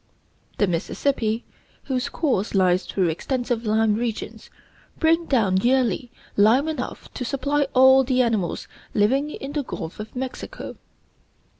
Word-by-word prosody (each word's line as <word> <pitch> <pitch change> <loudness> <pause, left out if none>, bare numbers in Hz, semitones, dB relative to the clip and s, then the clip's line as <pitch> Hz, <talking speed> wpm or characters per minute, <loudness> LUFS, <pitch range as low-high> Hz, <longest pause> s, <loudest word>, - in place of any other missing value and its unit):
The 205 - +3
Mississippi, 220 +6 -1 0.4
whose 255 -2 -2
course 245 - -1
lies 185 -1 +3
through 185 -3 +1
extensive 240 - -2
lime 220 0 +3
regions, 225 0 -4 0.5
brings 330 +1 +2
down 210 -8 +3
yearly 245 +1 +1 0.3
lime 230 +8 +4
enough 305 -6 -5
to - - -4
supply 280 +3 0
all 265 +1 +7
the 255 0 +2
animals 220 -7 -1 0.3
living 265 +8 +2
in 275 -2 -6
the 295 0 -1
Gulf 165 - -7
of 215 +3 -8
Mexico. 260 - -6
245 Hz, 130 wpm, -23 LUFS, 210-270 Hz, 0.5 s, all